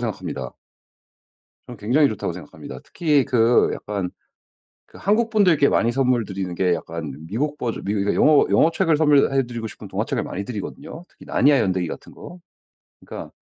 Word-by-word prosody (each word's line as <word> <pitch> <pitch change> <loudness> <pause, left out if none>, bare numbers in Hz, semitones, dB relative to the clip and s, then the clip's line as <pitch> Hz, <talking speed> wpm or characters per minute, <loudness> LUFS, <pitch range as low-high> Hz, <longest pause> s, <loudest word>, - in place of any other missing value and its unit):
생각합니다. - - -5 1.1
저는 120 -3 -10
굉장히 135 +8 +3
좋다고 110 - -3
생각합니다. - - -10
특히 150 -5 +1
그 120 -3 +3
약간 100 -4 -4 0.8
그 - - -16
한국분들께 205 -8 +3
많이 115 - +2
선물 125 -2 +1
드리는 95 -2 -5
게 90 -1 +1
약간 80 -3 -6
미국 145 - -2
버전 120 -4 -4
미국 100 +1 -1
이거 100 +1 0
이거 - - 0
영어 150 -1 +5
영어책을 165 -1 +3
선물해 140 -3 +3
드리고 120 -2 -6
싶은 110 - -10
동화책을 - - -2
많이 100 +2 -5
드리거든요? 140 - -7
특히 - - -17
나니아 140 0 +3
연대기 90 -3 0
같은 - - -9
거? 175 - -11 0.6
그러니까 - - -9
125 Hz, 395 characters per minute, -22 LUFS, 100-150 Hz, 1.1 s, 영어